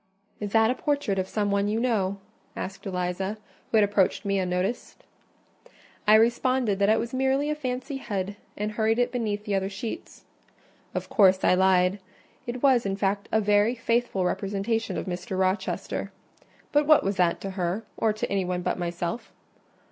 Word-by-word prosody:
"Is 205 -1 -4
that 225 +1 +5
a - - +2
portrait 280 -8 -1
of 185 - -1
some 205 0 -1
one 200 0 +1
you 215 +2 0
know?" 205 -6 0 0.4
asked 195 +1 -6
Eliza, 185 +2 -2 0.3
who 225 - +2
had 215 - +6
approached 205 -1 +1
me 200 -1 +1
unnoticed. 185 +5 -2 1.0
I 215 - +8
responded 235 -1 +2
that 200 +1 +3
it 220 - +5
was 235 +2 -3
merely 265 +3 +1
a - - -1
fancy 260 -1 -4
head, 200 -5 -3 0.2
and 210 +1 -2
hurried 220 +1 +1
it 245 0 +1
beneath 215 -4 -2
the 205 - -2
other 195 0 0
sheets. 220 - -7 0.7
Of - - -3
course, 190 -4 +4
I - - +5
lied: 185 +1 +3 0.5
it 240 +2 -5
was, 260 -4 +5
in 195 -1 -1
fact, 200 0 -1
a 220 - +3
very 210 +3 +3
faithful 230 -5 0
representation 200 +4 -1
of - - -3
Mr. 185 +2 -4
Rochester. 190 +1 -1 0.6
But 295 0 +3
what 305 -1 +6
was 195 0 -1
that 175 -2 +2
to 195 - -4
her, 185 +3 -2
or 225 - +1
to 215 - -3
any 195 -1 0
one 180 0 -2
but - - -1
myself? 175 +4 -3
205 Hz, 180 wpm, -26 LUFS, 190-235 Hz, 1.0 s, I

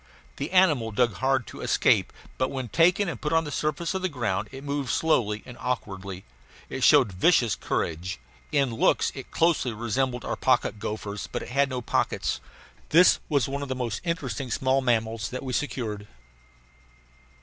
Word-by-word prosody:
The 140 - -3
animal 160 -11 +4
dug 115 +1 +2
hard 130 -2 +1
to - - -10
escape, - - +2 0.3
but 130 - +1
when 130 -3 -4
taken 175 - +3
and 175 - -5
put 150 - -2
on 165 0 +3
the 150 - -6
surface 155 +4 -1
of 190 - -2
the 185 - 0
ground 120 - -2
it 135 +1 -9
moved 140 -2 -2
slowly 110 -10 +1
and 125 - -10
awkwardly. 95 -6 -4 0.4
It - - -4
showed - - +6
vicious 115 - +3
courage. 85 0 -3 0.3
In 140 -4 +2
looks 115 - +2
it - - -9
closely 160 -7 +1
resembled 120 +3 -1
our - - -2
pocket 125 -4 +1
gophers, 105 -1 -5
but - - -3
it - - -9
had 140 +2 +2
no 125 -2 -4
pockets. - - -1 0.5
This 175 +3 +6
was 140 -7 +2
one 140 +1 -3
of 140 - -5
the 130 - -1
most 120 -4 -3
interesting 140 - -3
small 130 +3 +1
mammals 115 -4 0
that 130 - -5
we 130 -1 -4
secured. 110 -7 -3
130 Hz, 175 wpm, -26 LUFS, 110-145 Hz, 0.5 s, showed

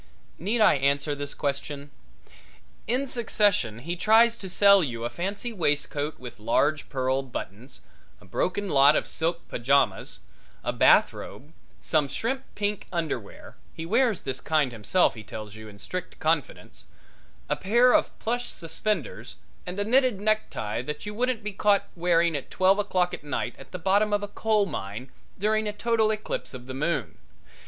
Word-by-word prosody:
Need 215 +7 0
I 210 - +6
answer 140 +2 +1
this 145 0 -5
question? 140 0 -4 1.0
In 250 +5 0
succession 210 - +1
he 165 +9 -4
tries 225 +5 +5
to 190 - -7
sell 200 0 +6
you 120 -5 -4
a 120 - -3
fancy 200 - -4
waistcoat 150 -4 -1
with 125 -3 -10
large 145 +7 +1
pearl 130 0 0
buttons, 125 -1 -8 0.4
a 105 - -18
broken 180 - -1
lot 140 -2 +5
of - - +1
silk 165 +1 -2
pajamas, 135 +4 +1 0.4
a - - -1
bath - - +5
robe, 150 +4 -10 0.3
some 150 -3 +1
shrimp 260 - -3
pink 205 -1 -2
underwear 155 - -4 0.2
he 160 - -5
wears 225 +2 +2
this 130 -1 -4
kind 150 -5 +1
himself 115 - +2
he 110 - -9
tells 110 -1 -8
you 110 0 -10
in 100 - -13
strict 180 - -6
confidence 155 -2 -2 0.6
a - - 0
pair 240 +6 +4
of - - +2
plush 245 +2 -2
suspenders 165 - -3 0.3
and 180 +3 -4
a - - +2
knitted 250 -1 +3
necktie 205 - -1
that 150 +7 -6
you 210 - -5
wouldn't 245 0 -1
be 210 - -3
caught 200 0 +2
wearing 170 -1 +2
at 140 - -5
twelve 190 +2 +3
o'clock 185 -3 +1
at - - -6
night 145 - -3
at - - -13
the 180 - -5
bottom 200 +4 +2
of 205 0 +1
a - - -3
coal 215 0 +1
mine 125 - -6 0.3
during 215 +2 +1
a - - -1
total 220 +1 +1
eclipse 215 -10 -3
of 125 -1 -9
the 130 - -7
moon. 150 +5 -2
170 Hz, 165 wpm, -26 LUFS, 140-210 Hz, 1.0 s, I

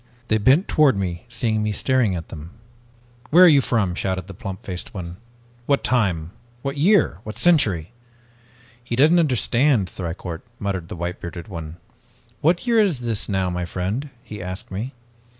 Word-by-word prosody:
"They 110 - +3
bent 135 - +4
toward 145 -9 +4
me, 90 +1 -3
seeing 110 -2 0
me 105 0 0
staring 115 -1 +1
at 80 -2 -6
them. 80 +7 -10 0.7
"'Where 175 +4 +7
are - - +9
you 145 -4 +6
from?' 105 -8 0
shouted 95 -1 -2
the 95 - -9
plump 95 0 -7
faced 90 +2 -6
one. 90 -2 -6 0.5
'What 140 -1 +2
time 90 -10 +1 0.3
what 140 0 -2
year 165 - +3
what 110 - -7
century?' 110 - +3 0.9
"'He 120 -1 -3
doesn't 155 +7 +5
understand, 130 - +2
Thicourt,' 85 -2 -6 0.2
muttered 95 -6 -3
the - - -7
white 85 +1 -4
bearded 85 0 -7
one. 80 -3 -7 0.6
'What 170 +7 +2
year 235 -2 +3
is 185 - +2
this 115 -4 -2
now, 95 -2 0
my 90 0 -2
friend?' 100 - -3
he 105 -4 -8
asked 90 +1 -7
me. 115 +8 -5
105 Hz, 170 wpm, -22 LUFS, 90-135 Hz, 0.9 s, are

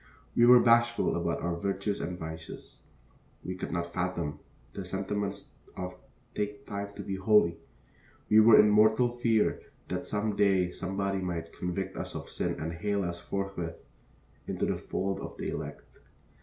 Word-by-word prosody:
We 120 - +6
were 125 0 +9
bashful 120 0 +4
about 85 -1 -1
our 85 0 0
virtues 100 +2 -2
and 90 +1 -4
vices; 80 -1 -8 0.6
we 90 - -3
could 90 - -5
not 85 0 -1
fathom 85 -4 -2 0.3
the 100 - -5
sentiments 100 +2 -3 0.3
of 90 0 -5 0.4
Take 105 0 -3
Time 100 0 -5
to - - -6
be 95 - -3
Holy; 95 -4 +4 0.7
we 110 - +6
were 110 0 +8
in 105 - +8
mortal 110 +3 +5
fear 120 -3 +1 0.3
that - - -2
some 105 0 -1
day 95 -3 +3
somebody 95 +1 -2
might 85 -3 -4
convict 95 +2 -3
us - - -5
of - - -6
sin - - -1
and 80 +1 -3
hale 100 +4 -1
us 85 -1 -3
forthwith 90 -2 -4 0.6
into - - -1
the - - -1
fold 95 +1 -2
of - - -7
the - - -3
elect. - - -5
95 Hz, 160 wpm, -30 LUFS, 90-105 Hz, 0.7 s, were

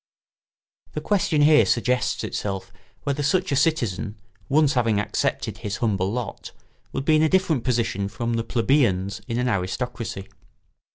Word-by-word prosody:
] - - -38
The - - 0
question 165 -7 +2
here 150 0 +7
suggests 125 +1 +1
itself 95 -1 -4 0.3
whether 140 +1 -1
such 185 +4 +1
a - - +2
citizen, 120 - 0 0.3
once 145 0 +4
having 115 -5 +2
accepted 105 - -2
his 105 0 -4
humble 100 -4 0
lot, 125 +1 -5 0.4
would 135 - -3
be 155 - +4
in - - +3
a 160 - +4
different 170 -9 +2
position 115 -5 0
from 115 +4 -3
the 115 0 0
plebeians 115 -6 +1
in 115 -2 -2
an 125 +1 0
aristocracy. 110 0 -3
120 Hz, 155 wpm, -24 LUFS, 105-145 Hz, 0.4 s, here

